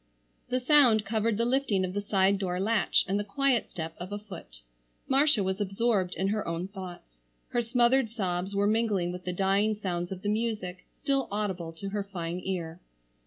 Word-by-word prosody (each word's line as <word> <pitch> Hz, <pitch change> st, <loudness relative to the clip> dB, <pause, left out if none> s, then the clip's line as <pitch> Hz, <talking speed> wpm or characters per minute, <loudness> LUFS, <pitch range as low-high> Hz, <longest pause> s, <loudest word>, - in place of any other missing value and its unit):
The 255 Hz, -, +1 dB
sound 250 Hz, -5 st, +5 dB
covered 220 Hz, 0 st, 0 dB
the 230 Hz, -, +1 dB
lifting 240 Hz, -7 st, +1 dB
of 180 Hz, -, -5 dB
the 205 Hz, -, -1 dB
side 195 Hz, -1 st, +2 dB
door 180 Hz, -2 st, -2 dB
latch 215 Hz, +2 st, +2 dB
and 195 Hz, +2 st, 0 dB
the -, -, -1 dB
quiet 250 Hz, +3 st, +1 dB
step 160 Hz, -1 st, -5 dB
of 180 Hz, +3 st, -7 dB
a 205 Hz, -, -2 dB
foot. 180 Hz, -, -11 dB, 0.5 s
Marcia 275 Hz, -4 st, +4 dB
was 190 Hz, +2 st, -1 dB
absorbed 195 Hz, -2 st, 0 dB
in 190 Hz, +1 st, 0 dB
her 215 Hz, +1 st, -1 dB
own 170 Hz, +2 st, -2 dB
thoughts. 180 Hz, -, -10 dB, 0.3 s
Her 240 Hz, -, +1 dB
smothered 240 Hz, +1 st, +3 dB
sobs 190 Hz, -3 st, -2 dB
were 200 Hz, 0 st, +2 dB
mingling 210 Hz, -5 st, +1 dB
with 180 Hz, 0 st, -8 dB
the 180 Hz, -, -1 dB
dying 195 Hz, +3 st, +2 dB
sounds 175 Hz, -3 st, -3 dB
of 190 Hz, -1 st, -6 dB
the -, -, -2 dB
music, 210 Hz, -5 st, -2 dB, 0.2 s
still 275 Hz, -2 st, +1 dB
audible 190 Hz, -5 st, -2 dB
to 195 Hz, +5 st, -6 dB
her 205 Hz, 0 st, -2 dB
fine 175 Hz, -3 st, -4 dB
ear. 170 Hz, -3 st, -4 dB
200 Hz, 190 wpm, -29 LUFS, 180-225 Hz, 0.5 s, sound